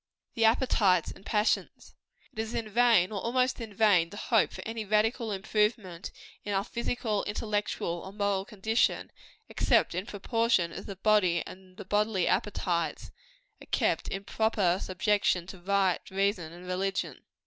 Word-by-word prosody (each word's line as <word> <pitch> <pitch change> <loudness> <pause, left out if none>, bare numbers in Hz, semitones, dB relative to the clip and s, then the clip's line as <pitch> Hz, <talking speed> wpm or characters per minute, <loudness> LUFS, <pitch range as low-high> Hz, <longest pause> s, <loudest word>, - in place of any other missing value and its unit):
THE 225 - +2
APPETITES 215 -7 +3
AND - - -13
PASSIONS. 210 0 0 0.4
It 220 - -9
is 220 +1 -3
in 225 - -2
vain, 225 -4 +4
or 200 -3 -3
almost 250 +1 0
in 225 -2 -6
vain, 200 -5 +3
to 205 - -10
hope 225 0 +2
for - - -8
any 225 0 -4
radical 215 +2 +1
improvement 200 -2 -1 0.3
in 205 -1 -2
our 195 - +1
physical, 230 -2 -2
intellectual 205 -5 -2
or 190 - -8
moral 200 -1 0
condition, 220 +2 0 0.4
except - - +2
in 185 +4 -3
proportion 225 -4 +1
as - - -8
the 200 - -6
body 190 -4 +2
and 185 0 -13
the 205 - -8
bodily 205 -2 +1
appetites 170 -6 -1 0.5
are - - -13
kept - - +1
in 195 0 -4
proper 200 -4 +1
subjection 185 -1 +1
to 190 0 -10
right 190 0 +1
reason 190 -4 -1
and 175 +1 -12
religion. 185 +1 -2
205 Hz, 155 wpm, -29 LUFS, 185-220 Hz, 0.5 s, vain